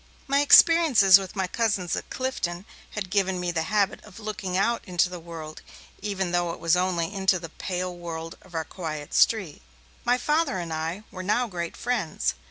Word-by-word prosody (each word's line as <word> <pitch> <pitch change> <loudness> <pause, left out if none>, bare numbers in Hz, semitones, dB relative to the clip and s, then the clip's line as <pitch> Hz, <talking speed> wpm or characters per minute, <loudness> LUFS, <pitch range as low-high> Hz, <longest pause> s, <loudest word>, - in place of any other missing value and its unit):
My 275 +1 +2
experiences 290 - +7
with 190 0 -8
my 190 -1 0
cousins 200 -4 0
at - - -6
Clifton 195 -9 -3 0.2
had 195 -3 -5
given 190 -2 +1
me 180 -1 -1
the 165 -1 -1
habit 205 -1 +1
of 210 0 -13
looking 205 -4 -3
out 230 +4 +1
into 180 -2 +1
the 180 -1 -7
world 160 -2 -9 0.4
even 195 -3 -2
though 175 -1 +1
it - - -10
was 165 +1 +3
only 180 0 0
into 190 -2 +2
the 165 -2 -8
pale 180 +1 -4
world 165 -1 -6
of 185 -2 -15
our 160 -1 -1
quiet 155 -4 -6
street. 195 -10 +2 0.4
My 245 +1 +3
Father 300 - +1
and 170 -2 -4
I 165 +6 -3
were 185 - -7
now 210 +6 +1
great 175 -6 -5
friends. 235 -10 -1
185 Hz, 185 wpm, -26 LUFS, 170-210 Hz, 0.4 s, experiences